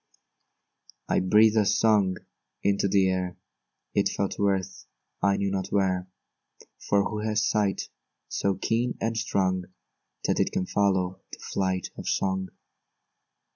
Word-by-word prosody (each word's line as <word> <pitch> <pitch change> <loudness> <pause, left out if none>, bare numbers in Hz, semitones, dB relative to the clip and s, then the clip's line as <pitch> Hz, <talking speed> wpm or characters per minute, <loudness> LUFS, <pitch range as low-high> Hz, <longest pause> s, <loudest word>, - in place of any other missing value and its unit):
I - - +2
breathed 105 +4 +5
a 105 - +4
song 100 -5 +3 0.5
into 100 0 +2
the 95 -1 +3
air, 90 -1 -1 0.6
It - - +2
fell 100 - -1
to 100 - 0
earth 95 -2 -2 0.3
I 100 +1 +3
knew 100 -1 -1
not 95 -1 -2
where; 95 -2 0 0.8
For 100 -1 +4
who 105 - -4
has 110 0 0
sight 105 -2 0 0.4
so 100 -1 0
keen 115 +6 -1
and 115 0 -1
strong, 95 -5 0 0.6
That - - +1
it - - +2
can 90 - -1
follow 95 -2 0
the - - -8
flight 95 -1 -2
of - - -7
song? 95 -1 0
100 Hz, 135 wpm, -27 LUFS, 95-105 Hz, 0.8 s, breathed